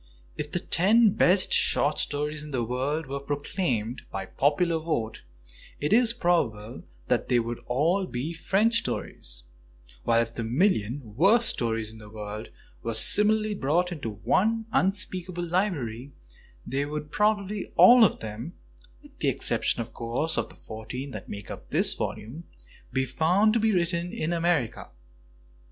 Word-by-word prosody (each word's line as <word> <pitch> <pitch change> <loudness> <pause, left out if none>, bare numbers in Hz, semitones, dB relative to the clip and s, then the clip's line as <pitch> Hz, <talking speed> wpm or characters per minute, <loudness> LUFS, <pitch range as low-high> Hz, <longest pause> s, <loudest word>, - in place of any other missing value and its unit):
If 150 - -5
the - - -1
ten 210 +5 +4
best 185 0 +4
short 145 +2 +3
stories 150 +1 -2
in 150 - -9
the 130 -4 -1
world 135 +7 -2
were 140 +1 -4
proclaimed 140 - -2
by 95 -1 -4
popular 160 - +1
vote, 120 -9 -3 0.6
it 150 +7 0
is 235 0 +5
probable 135 - -1 0.3
that - - 0
they 125 - +4
would 120 0 -2
all 170 +10 +1
be 135 +5 -4
French 205 +7 +2
stories; - - -3 0.6
while 115 - +3
if 115 0 -9
the 115 - -4
million 120 - 0
worst 210 - +4
stories 115 -2 0
in 110 - -13
the 105 -1 -12
world 105 0 -7 0.3
were 115 -1 -3
similarly 215 - +3
brought 175 +1 0
together 150 -10 -5
into 100 - -20
one 225 +3 +2
unspeakable 185 -3 0
library, 145 - -2 0.5
they 135 +2 -1
would 150 +1 -5
probably 210 0 0
all 245 -1 +8
of 215 - +2
them 110 +9 -6 0.3
— - - -28
with - - -18
the - - 0
exception, - - +1
of 115 - -8
course, 120 +8 -2
of - - -1
the - - -14
fourteen 125 +5 -7
that 105 -5 -8
make 100 -1 -7
up - - -9
this - - +1
volume 135 +11 -5 0.2
— - - -25
be 130 0 0
found 180 - +2
to 230 - +2
be 220 0 +2
written 175 -2 0
in 165 +2 -2
America. 165 -9 0
150 Hz, 160 wpm, -26 LUFS, 115-185 Hz, 0.6 s, all